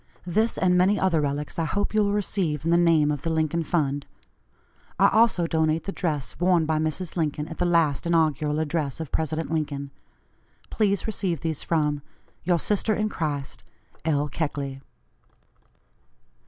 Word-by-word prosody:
This, 215 +6 +1
and 180 -1 +3
many 185 +3 +3
other 170 -5 +2
relics, 145 +2 -3
I 165 - +1
hope 205 +7 -1
you 215 -1 +3
will 200 - +1
receive 185 -7 -1
in 165 - +2
the 170 - +5
name 160 -4 +4
of 145 -3 -3
the 165 - -2
Lincoln 160 +1 0
fund. 145 -3 -1 0.9
I - - +5
also 220 -5 +3
donate 160 -1 +1
the 195 - -4
dress 155 -9 -3
worn 175 -2 +3
by 155 0 0
Mrs. 155 +3 -3
Lincoln 155 -3 -1
at 165 - -9
the 180 - +2
last 165 -3 +2
inaugural 155 -3 +1
address 155 -3 -2
of 160 -3 -6
President 160 +1 -2
Lincoln. 145 -3 -2 0.8
Please 200 -3 +1
receive 190 -7 -2
these 160 -3 -2
from 150 -3 0 0.4
Your 175 0 +2
sister 210 +5 +1
in 215 0 0
Christ, 145 -7 -4 0.4
"L. 150 -2 +1
KECKLEY." 140 -3 -3
160 Hz, 160 wpm, -25 LUFS, 150-180 Hz, 0.9 s, the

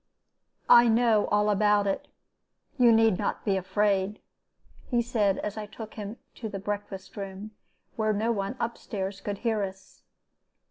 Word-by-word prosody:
"'I 240 0 +8
know 225 -2 +3
all 210 0 +2
about 205 0 +3
it. 195 - -2 0.7
You 240 -2 +7
need 225 -4 +4
not - - -2
be 200 -3 +2
afraid,' 200 +1 0 0.7
he 240 - +1
said, 220 -5 +1
as 210 +1 -4
I 210 -1 -5
took 215 +1 -9
him 210 +2 -7 0.2
to 220 - -5
the 200 - -5
breakfast 200 -1 -5
room, 200 +1 -7 0.5
where 215 -1 +1
no 215 +3 0
one 200 +1 -2
up 235 0 -3
stairs 195 -1 -5
could 205 0 -4
hear 225 -1 0
us. 190 -1 -7
210 Hz, 155 wpm, -27 LUFS, 195-225 Hz, 0.7 s, I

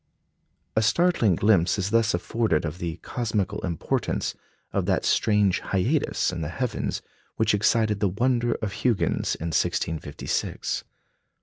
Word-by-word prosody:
A 110 - +4
startling 115 - +3
glimpse 100 -2 +3
is 100 0 -1
thus 115 -4 +3
afforded 90 -3 0
of 80 +3 -5
the 85 -1 -3
cosmical 110 -6 -2
importance 85 -4 -1 0.4
of - - 0
that - - +1
strange 105 -4 +3
"hiatus" 115 - 0
in 90 -2 -4
the 75 - -3
heavens 120 +6 -2 0.3
which 110 -1 +2
excited 105 0 +2
the 100 -1 +2
wonder 120 +4 +1
of 105 - -1
Huygens 120 -5 0
in 85 - -4
1656. 75 -2 -1
105 Hz, 130 wpm, -25 LUFS, 90-115 Hz, 0.4 s, A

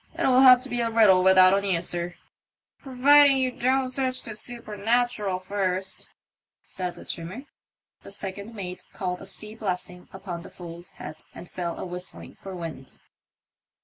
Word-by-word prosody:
It'll 255 -1 +3
have 255 -2 +8
to 265 - -7
be 245 -1 -1
a 230 - 0
riddle 215 -5 +5
without 185 0 +6
an 200 - 0
answer." 175 -2 -2 0.7
Providing 280 +1 +5
you 260 -1 +1
don't 260 +2 +1
sarch 255 0 -1
the 225 - -7
soopernatural 220 -2 0
first," 190 0 -2 0.5
said 180 -2 -5
the - - -12
trimmer. 180 +10 -6 0.6
The - - -12
second 200 +2 -7
mate 180 -3 -7
called 180 -2 -4
a - - -8
sea 215 0 -8
blessing 180 -4 -5
upon 190 -3 -7
the - - -11
fool's 175 0 -10
head, 155 +1 -9
and 175 - -9
fell 175 -2 -4
a - - -5
whistling 180 0 -8
for 195 -1 -9
wind. 160 -7 -7
195 Hz, 155 wpm, -25 LUFS, 180-240 Hz, 0.7 s, have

